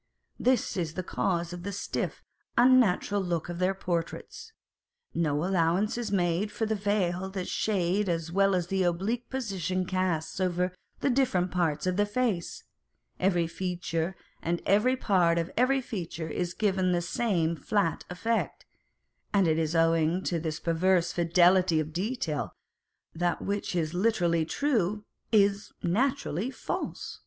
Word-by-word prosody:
This 255 -5 +1
is 165 -3 -2
the 185 - -3
cause 175 -1 -1
of 175 - -6
the 200 +3 -4
stiff, 200 - -3 0.3
unnatural 235 -5 +4
look 175 -3 -2
of 175 0 -5
their 185 +1 +1
portraits. 185 - -4 0.6
No 155 -1 0
allowance 185 +2 +1
is 240 -3 -3
made 180 +2 +1
for 225 - -2
the 220 - 0
veil 195 -3 0
that 190 -2 -4
shade 195 -1 0
as 165 -1 -2
well 195 +1 +3
as 180 0 -2
an 190 -1 +1
oblique 195 +7 -1
position 190 - -2
casts 185 -3 -1
over 180 0 0 0.3
the 275 - +2
different 215 -9 +1
parts 160 -4 0
of 185 0 0
the 205 0 +2
face; 210 -5 -1 0.6
every 180 -2 +2
feature, 175 0 -3 0.3
and 170 +1 -1
every 215 +7 +3
part 180 -8 +3
of 165 +1 -1
every 265 +2 +3
feature 170 -8 -5
is 175 +2 -3
given 195 -3 +1
with 180 - +3
the 175 - +1
same 175 -4 0
flat 185 +2 0
effect, 225 +6 -2 0.7
and 195 -4 +3
it 160 0 +2
is 160 0 -1
owing 165 +2 +3
to 170 - -1
this 155 -1 -3
perverse 175 +1 +2
fidelity 175 0 +4
of 155 0 -3
detail, 170 - -2 0.6
that 175 +1 0
that - - -14
which 200 -2 -2
is 160 -2 -1
literally 175 -5 +2
true, 210 - 0 0.3
is 200 -1 +3
naturally 235 - 0
false. 265 - -5
180 Hz, 150 wpm, -28 LUFS, 170-205 Hz, 0.7 s, unnatural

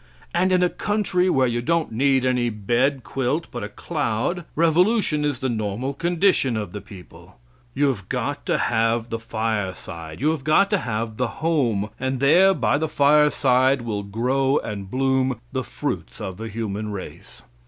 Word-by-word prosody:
And 185 +2 +2
in 180 -1 +3
a 180 - +3
country 190 -3 0
where 135 -6 +3
you 120 -1 -1
don't 165 +5 0
need 130 +2 +2
any 125 -2 +1
bed 120 +5 0
quilt 135 +5 -2
but 120 -3 -5
a 105 - -5
cloud, 150 - -2
revolution 170 0 +2
is 145 -4 -1
the 130 - 0
normal 115 +3 -2
condition 170 - +1
of 105 -5 -4
the 105 - -6
people. 95 - -14 0.4
You 145 +2 +2
have 100 -8 -4
got - - -2
to - - +2
have 115 0 0
the 115 - -2
fireside; 105 -8 -4
you 150 +3 +2
have 155 -4 -4
got 195 +8 +3
to 205 - +3
have 110 -3 -3
the 125 - 0 0.2
home, 115 -11 +1
and 130 0 -2
there 175 +8 +5
by 145 - +1
the 160 0 -1
fireside 140 -3 +3
will 105 -3 -2
grow 130 +7 0
and 100 -3 -5
bloom 130 0 +1
the 130 -1 -2
fruits - - -5
of 95 -1 -5
the 110 +1 -6
human 105 -1 -4
race. 100 -2 -9
130 Hz, 175 wpm, -23 LUFS, 110-150 Hz, 0.4 s, there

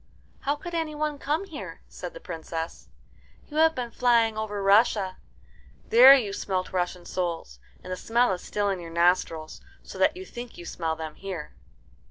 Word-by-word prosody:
"How 285 +1 0
could 345 +4 -8
any 320 -2 -2
one 300 -1 -2
come 305 +8 -1
here?" 325 -6 -8
said - - -8
the - - -7
Princess. 165 - -6 0.6
"You 300 - -8
have 320 0 +5
been 245 -3 -4
flying 230 -3 +3
over 210 -2 -3
Russia. 200 -2 +4 0.7
There 255 +4 +10
you 215 -7 -1
smelt 190 -2 -2
Russian 180 -1 -2
souls, 170 - -3 0.2
and 185 - -5
the - - -2
smell 235 +3 +2
is 180 - -5
still 205 -1 -1
in 195 -2 -1
your 170 -1 -8
nostrils, 170 -2 +1 0.2
so - - -10
that - - +3
you 375 - -7
think 240 -5 -9
you 175 - -9
smell 165 -2 -2
them 160 -1 -6
here." 180 -6 -7
205 Hz, 180 wpm, -27 LUFS, 175-265 Hz, 0.7 s, There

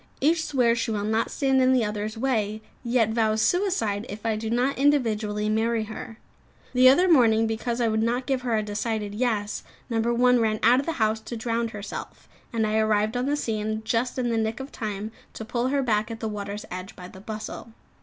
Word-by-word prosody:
Each 320 +3 +2
swears 245 -6 +2
she 230 - -1
will 210 -2 -1
not 220 +2 0
stand 270 -2 +2
in 255 0 +4
the 245 -3 +3
others' 210 +1 -3
way, 220 -4 -1 0.2
yet 235 -2 +2
vows 220 -1 +1
suicide 240 - +1
if 210 +2 -8
I 225 -1 +1
do 220 +1 -4
not 250 +4 +1
individually 220 -7 +1
marry 220 +1 +1
her. 220 +1 -8 0.6
The 255 0 +7
other 350 +8 +5
morning, 230 -9 +5
because 235 +2 -2
I 235 - +2
would 220 0 +1
not 240 +3 0
give 265 -2 0
her 240 -3 0
a 215 - 0
decided 210 0 -3
"Yes," 215 -2 -1 0.3
No. 225 - +1
1 240 +2 +3
ran 220 -1 +1
out 245 +3 +6
of 275 - -4
the 330 - 0
house 220 -4 +1
to 225 +2 -7
drown 230 +1 -1
herself, 210 -2 -8 0.2
and 225 -3 0
I 215 +1 +1
arrived 215 +1 +1
on 250 +2 0
the 290 +1 +1
scene 220 -4 -2
just 240 +3 0
in 245 -2 0
the 230 - 0
nick 220 +2 -1
of 265 +1 -7
time 210 -1 -4 0.2
to 220 - -7
pull 240 +2 -1
her 275 +1 +1
back 215 -3 +1
at 225 -1 -6
the 220 - -3
water's 205 0 -5
edge, 185 +1 -7
by 180 -1 -9
the 190 +1 -13
bustle. 215 +2 -7
225 Hz, 215 wpm, -25 LUFS, 215-250 Hz, 0.6 s, The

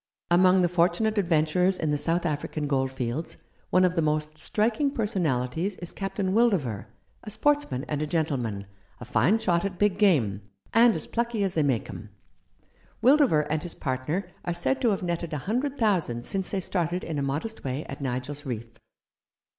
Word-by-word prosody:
"Among 185 +1 +5
the - - +4
fortunate 180 +5 +1
adventurers 180 +1 +2
in 155 -2 -1
the 150 - +1
South 170 +3 0
African 150 -1 -2
goldfields, 135 +1 -2 0.3
one 185 0 +4
of 180 - +1
the 165 - +2
most 155 0 0
striking 220 - +1
per 235 -6 -1
sonalities 165 - -1
is 175 - -5
Captain 195 -1 -2
Wildover, 190 - +1 0.4
a - - -7
sportsman 220 - +1
and 150 -1 -2
a 155 - -1
gentleman, 130 - -1 0.3
a 120 - -8
fine 190 - +3
shot 175 -6 +1
at 195 -2 -3
big 205 -1 +1
game, 125 - +3 0.3
and 230 0 +6
as - - -3
plucky 235 -3 -1
as 190 -2 0
they 160 - +1
make 135 -6 0
'em. 105 - -9 0.9
Wildover 260 - +5
and 155 0 -1
his 175 - -4
partner 140 +8 -2 0.2
are 175 - -2
said 265 +10 0
to 240 - +3
have 195 -3 -1
netted 170 -2 -3
a - - -1
hundred 255 +7 -1
thousand 170 - 0
since 190 -1 -2
they 195 - -1
started 175 -1 -1
in 155 -3 -3
a - - -1
modest 145 +11 -3
way 135 +3 -3
at 140 - -8
Nigel's 135 +2 -3
Reef." 115 -4 -6
170 Hz, 180 wpm, -26 LUFS, 140-200 Hz, 0.9 s, and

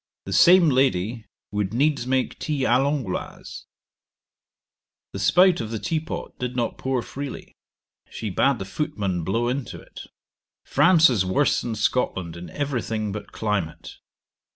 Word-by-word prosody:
The 95 - -4
same 175 - +7
lady 115 -4 +1 0.2
would 105 +1 -2
needs 140 -1 +1
make 130 0 -1
tea 150 -3 -2
Ã 130 0 +3
l'Angloise. 140 -10 -4 1.5
The 100 - -5
spout 180 - +4
of 110 - -5
the 115 - -3
tea 160 +8 -1
pot 160 +2 -6
did 125 0 -3
not 120 -2 -2
pour 130 -2 -1
freely; 140 -1 -7 0.6
she 110 - -5
bad 135 +8 +2
the 95 - -6
footman 95 - -3
blow 115 +8 0
into 130 0 -3
it. - - -12 0.6
France 170 -3 +5
is 105 -6 +2
worse 125 +10 +1
than 115 -2 -4
Scotland 95 -6 -1
in 85 +1 -9
every 140 -4 -2
thing 110 -2 -3
but 100 0 -7
climate. 105 -7 -3
120 Hz, 150 wpm, -24 LUFS, 100-140 Hz, 1.5 s, same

